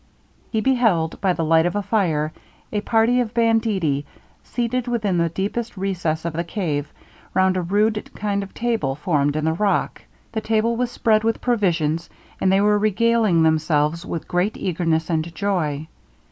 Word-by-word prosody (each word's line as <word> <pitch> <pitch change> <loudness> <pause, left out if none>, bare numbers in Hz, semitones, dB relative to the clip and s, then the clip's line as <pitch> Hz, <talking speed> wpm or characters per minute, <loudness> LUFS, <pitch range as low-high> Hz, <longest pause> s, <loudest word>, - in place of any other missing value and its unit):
He 220 - 0
beheld, 225 -11 +1
by 190 -2 +2
the 165 -2 -2
light 160 +1 +4
of 175 - -3
a 205 - -1
fire, 160 -8 0 0.4
a 210 - -1
party 225 +3 +2
of 240 -1 -2
banditti 220 -11 +1 0.4
seated 245 +1 -2
within 215 -7 0
the 170 0 +2
deepest 205 +6 -3
recess 175 -5 -2
of 170 - -2
the 170 +2 -1
cave 160 -6 -3 0.4
round 185 0 +3
a 185 - 0
rude 210 +4 0
kind 200 -1 -1
of 195 - -7
table 225 - -1
formed 145 -2 0
in 155 0 -1
the 160 - +2
rock. 200 +4 0 0.3
The 220 -1 -2
table 225 +1 +1
was 245 +1 -1
spread 220 -2 +2
with 225 0 0
provisions, 170 -9 0 0.3
and 190 - +2
they 195 +1 +4
were 210 0 +3
regaling 215 -4 +3
themselves 155 0 +1
with 170 - -5
great 180 +4 0
eagerness 165 -3 0
and 165 +1 -2
joy. 160 -7 -1
190 Hz, 170 wpm, -22 LUFS, 160-220 Hz, 0.4 s, light